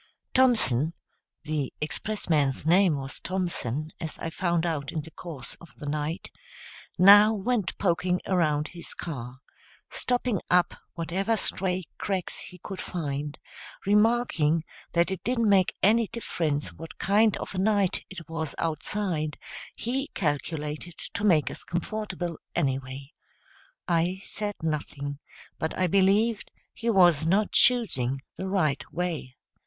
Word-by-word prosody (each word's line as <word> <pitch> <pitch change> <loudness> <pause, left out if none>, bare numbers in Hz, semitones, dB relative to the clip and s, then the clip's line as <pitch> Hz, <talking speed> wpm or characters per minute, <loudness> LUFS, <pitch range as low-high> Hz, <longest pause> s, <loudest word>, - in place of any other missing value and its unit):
Thompson 195 - +3 0.5
the 150 -3 -2
expressman's 155 -5 -1
name 175 0 +5
was 135 0 -6
Thompson, 160 -6 -2
as 160 -2 -5
I 165 - -4
found 175 -1 0
out 150 -5 -2
in 155 - -2
the 160 +2 -12
course 165 -6 -8
of 165 -5 -15
the - - -9
night 150 +3 -3 0.7
now 205 +4 +8
went 215 -1 -1
poking 180 -1 +1
around 155 -5 +1
his 175 -1 -9
car, 130 -5 -6 0.5
stopping 245 -5 0
up 180 -1 +4 0.2
whatever 190 +7 0
stray 185 -2 -1 0.2
cracks 190 -3 -2
he 180 - -9
could 190 +2 -7
find, 145 -3 -3 0.5
remarking 205 -7 +3 0.3
that 170 +2 +3
it 190 - -4
didn't 235 -2 +1
make 195 -3 +4
any 225 +2 +5
difference 160 -10 -2
what 165 0 -10
kind 210 +2 +3
of - - -6
a 185 - -2
night 200 -2 +2
it 180 -4 -9
was 160 -1 -4
outside, 160 -1 -1 0.4
he 265 +4 -2
calculated 150 0 -2
to 205 - -5
make 170 -8 +4
us - - -7
comfortable, 175 -2 -3 0.2
anyway. 135 0 -2 0.8
I 175 +2 +1
said 205 -1 -4
nothing, 145 -2 -3 0.4
but 160 - -2
I 185 - +3
believed 200 +4 +3 0.2
he 235 - -2
was 175 -7 +5
not 200 +5 +3
choosing 135 - +3
the 190 - -4
right 155 -8 +1
way. 165 -7 -3
175 Hz, 130 wpm, -27 LUFS, 150-200 Hz, 0.8 s, now